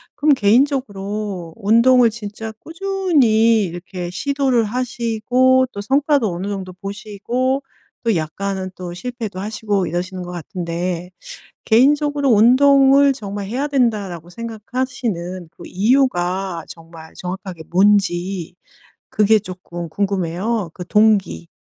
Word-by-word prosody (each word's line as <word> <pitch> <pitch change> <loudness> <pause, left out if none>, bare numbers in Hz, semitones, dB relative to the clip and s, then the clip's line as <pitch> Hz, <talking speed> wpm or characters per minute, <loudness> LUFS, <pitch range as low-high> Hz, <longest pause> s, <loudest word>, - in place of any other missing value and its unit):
그럼 295 0 +4
개인적으로 210 - 0
운동을 230 +3 +4
진짜 220 0 -7
꾸준히 305 - +2
이렇게 175 0 -6
시도를 260 +3 0
하시고 250 +2 +1
또 200 - -8
성과도 275 0 +2
어느 180 +3 -4
정도 190 -2 -5
보시고 215 +7 -3 0.4
또 225 -4 +2
약간은 185 +4 -3
또 175 -1 -7
실패도 225 -1 -6
하시고 205 -2 -1
이러시는 180 +2 -4
것 180 - -7
같은데. 175 +1 -4 0.6
개인적으로 285 +4 +3
'운동을 275 +4 +6
정말 205 -5 -6
해야 265 +7 -2
된다.'라고 205 - -1
생각하시는 220 -5 -4
그 - - -12
이유가 190 - 0
정말 165 -1 -12
정확하게 180 -2 -6
뭔지 185 -2 +1 0.5
그게 215 +1 +4
쪼끔 180 -3 -8
궁금해요 195 +2 -1
그 180 0 -8
동기. 205 - +2
210 Hz, 270 characters per minute, -19 LUFS, 180-250 Hz, 0.6 s, 운동을